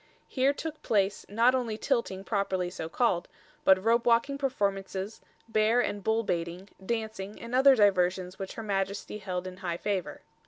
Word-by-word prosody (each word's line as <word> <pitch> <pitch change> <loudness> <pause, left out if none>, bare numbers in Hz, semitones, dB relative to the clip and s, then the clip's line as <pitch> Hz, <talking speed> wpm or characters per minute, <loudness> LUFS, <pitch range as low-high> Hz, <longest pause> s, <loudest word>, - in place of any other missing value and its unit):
Here 265 +1 +2
took 310 +2 -6
place, 200 -2 0
not 230 +5 +4
only 240 -4 -1
tilting 230 -8 -1
properly 190 -4 -1
so 160 -3 -5
called, 180 -3 +1 0.4
but 190 0 +5
rope 230 +1 +3
walking 240 +4 +2
performances, 200 -5 -2 0.3
bear 225 +1 +3
and 205 -4 -1
bull 220 +1 +1
baiting, 175 +1 -3
dancing 215 -2 -4
and 235 +1 -8
other 265 +1 +7
diversions 185 -3 +2
which 195 -1 -5
her 225 - -6
Majesty 200 0 -2
held 185 -2 -4
in 185 0 -7
high 175 -3 -3
favour. 195 -2 -3
205 Hz, 160 wpm, -29 LUFS, 190-235 Hz, 0.4 s, other